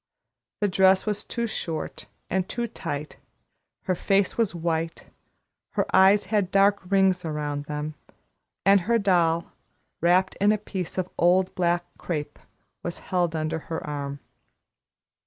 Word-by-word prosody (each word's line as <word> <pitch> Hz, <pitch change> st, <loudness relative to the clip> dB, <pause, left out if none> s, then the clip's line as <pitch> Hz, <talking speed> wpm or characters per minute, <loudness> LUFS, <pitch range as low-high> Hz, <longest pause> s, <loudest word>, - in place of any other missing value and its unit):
The 205 Hz, -, +3 dB
dress 190 Hz, 0 st, +4 dB
was 210 Hz, -1 st, -2 dB
too 235 Hz, -1 st, -3 dB
short 165 Hz, -8 st, -4 dB, 0.2 s
and 190 Hz, 0 st, -1 dB
too 240 Hz, -1 st, -2 dB
tight, 155 Hz, -9 st, -5 dB, 0.7 s
her 185 Hz, -, 0 dB
face 195 Hz, +2 st, +1 dB
was 225 Hz, -6 st, 0 dB
white, 165 Hz, -1 st, -3 dB, 0.6 s
her -, -, +1 dB
eyes 195 Hz, +2 st, +6 dB
had 205 Hz, -4 st, +1 dB
dark 200 Hz, +1 st, +4 dB
rings 190 Hz, -2 st, +3 dB
around 150 Hz, -2 st, -3 dB
them, 150 Hz, +1 st, -4 dB, 0.7 s
and 195 Hz, 0 st, +6 dB
her 230 Hz, +6 st, +2 dB
doll, 170 Hz, -5 st, +2 dB, 0.5 s
wrapped 180 Hz, +2 st, +3 dB
in 205 Hz, +1 st, +5 dB
a 215 Hz, -, +2 dB
piece 190 Hz, -4 st, -6 dB
of 185 Hz, -1 st, 0 dB
old 180 Hz, +2 st, +3 dB
black 175 Hz, -1 st, +1 dB
crape, 150 Hz, -4 st, -4 dB, 0.4 s
was 175 Hz, -, -4 dB
held 175 Hz, -3 st, -1 dB
under 160 Hz, +1 st, -1 dB
her 160 Hz, +1 st, -5 dB
arm. 140 Hz, -1 st, -4 dB
180 Hz, 140 wpm, -25 LUFS, 160-195 Hz, 0.7 s, eyes